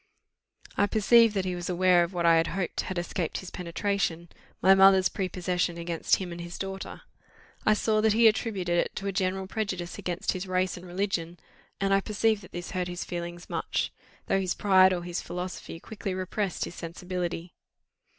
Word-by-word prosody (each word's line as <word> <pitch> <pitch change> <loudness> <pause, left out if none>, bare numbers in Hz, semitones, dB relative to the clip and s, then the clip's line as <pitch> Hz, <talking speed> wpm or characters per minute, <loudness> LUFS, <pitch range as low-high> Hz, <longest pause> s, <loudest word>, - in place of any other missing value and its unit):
I 205 - +4
perceived 225 +1 +5
that 190 -1 0
he 185 - -1
was 175 0 -4
aware 180 -1 +4
of 170 - -3
what 175 -2 -1
I 165 -1 +6
had 165 - +2
hoped 185 -2 -2
had 185 - -5
escaped 175 -1 -2
his 185 - -8
penetration 175 -1 -2 0.3
my 190 - +6
mother's 190 -1 +6
prepossession 180 -2 -1
against 170 -1 +1
him 185 -2 -5
and 170 0 -6
his 170 0 -7
daughter. 195 0 -6 0.6
I 215 - +6
saw 215 0 +1
that 220 -1 +4
he 230 +1 +6
attributed 195 -6 +1
it - - -1
to 195 - -5
a 200 - 0
general 190 0 -1
prejudice 185 -4 -4
against 175 0 -2
his 185 0 -4
race 185 0 0
and 180 +1 -10
religion, 175 -2 -2 0.4
and 195 0 +2
I 195 - +4
perceived 215 +1 +1
that 185 - -14
this 175 0 -6
hurt 180 -2 -2
his 175 0 -5
feelings 175 0 -6
much, - - -2 0.3
though 195 - +2
his 185 -1 -1
pride 190 -2 +5
or 175 -1 -1
his 175 0 -3
philosophy 180 -2 -6
quickly 200 -1 -5
repressed 185 0 -2
his - - -8
sensibility. 175 0 -5
185 Hz, 190 wpm, -28 LUFS, 175-195 Hz, 0.6 s, I